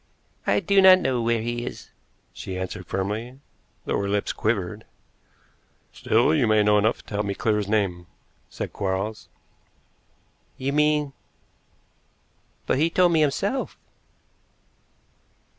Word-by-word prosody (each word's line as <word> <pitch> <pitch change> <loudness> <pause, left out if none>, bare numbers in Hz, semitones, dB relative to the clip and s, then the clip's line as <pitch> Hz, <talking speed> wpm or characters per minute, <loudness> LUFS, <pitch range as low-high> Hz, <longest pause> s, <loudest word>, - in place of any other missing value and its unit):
"I - - +3
do 200 +1 +4
not 190 -1 +9
know 130 -9 -1
where 115 -1 0
he 120 0 -3
is," - - -8 0.4
she 95 - -6
answered 95 -1 -5
firmly, 110 +7 -4 0.5
though - - -1
her 100 0 -2
lips 100 +1 -1
quivered. 105 -1 -2 1.1
"Still, 120 +7 +2
you 140 -7 +2
may 110 -1 +4
know 105 0 +4
enough 110 +3 0
to - - -11
help 105 0 -1
me 100 - -2
to - - -22
clear 110 -2 +1
his 105 -2 -2
name," 95 -5 -1 0.4
said - - -6
Quarles. 100 +3 -3 1.3
"You 135 +1 -2
mean 150 -1 +2 1.5
but - - +1
he 160 +2 +3
told 180 +1 +3
me 160 -2 +3
himself." 195 - -1
110 Hz, 135 wpm, -24 LUFS, 100-145 Hz, 1.5 s, not